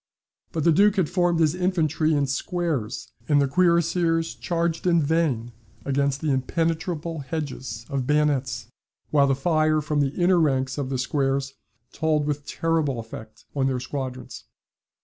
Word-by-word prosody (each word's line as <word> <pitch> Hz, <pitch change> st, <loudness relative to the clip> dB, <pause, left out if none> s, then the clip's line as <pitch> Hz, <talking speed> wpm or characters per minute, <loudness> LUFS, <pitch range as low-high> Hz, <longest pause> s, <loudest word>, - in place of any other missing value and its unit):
But 160 Hz, -, -2 dB
the 170 Hz, -, +5 dB
Duke 205 Hz, +5 st, +4 dB
had 185 Hz, -6 st, +1 dB
formed 175 Hz, -2 st, +2 dB
his 155 Hz, -2 st, +3 dB
infantry 165 Hz, -4 st, +1 dB
in 145 Hz, -1 st, +2 dB
squares, 135 Hz, -4 st, -2 dB, 0.2 s
and 145 Hz, -1 st, +5 dB
the 140 Hz, -, +3 dB
cuirassiers 170 Hz, 0 st, +2 dB
charged 170 Hz, 0 st, -2 dB
in 170 Hz, -1 st, +4 dB
vain 145 Hz, -7 st, 0 dB, 0.3 s
against 140 Hz, 0 st, 0 dB
the 155 Hz, -, 0 dB
impenetrable 165 Hz, +4 st, -1 dB
hedges 130 Hz, -5 st, -5 dB
of 135 Hz, -2 st, -2 dB
bayonets, 140 Hz, -5 st, +1 dB, 0.5 s
while 140 Hz, -2 st, +4 dB
the 135 Hz, -, +2 dB
fire 155 Hz, +1 st, +2 dB
from 150 Hz, 0 st, -1 dB
the 140 Hz, 0 st, 0 dB
inner 180 Hz, 0 st, +4 dB
ranks 135 Hz, -3 st, +1 dB
of 135 Hz, -2 st, -2 dB
the 135 Hz, -, -1 dB
squares 135 Hz, +1 st, 0 dB, 0.4 s
told 155 Hz, -2 st, +1 dB
with 145 Hz, -1 st, -3 dB
terrible 160 Hz, -6 st, 0 dB
effect 110 Hz, -1 st, -10 dB
on 135 Hz, -1 st, +1 dB
their 130 Hz, -1 st, 0 dB
squadrons. 130 Hz, -1 st, -6 dB
150 Hz, 150 wpm, -24 LUFS, 135-165 Hz, 0.5 s, the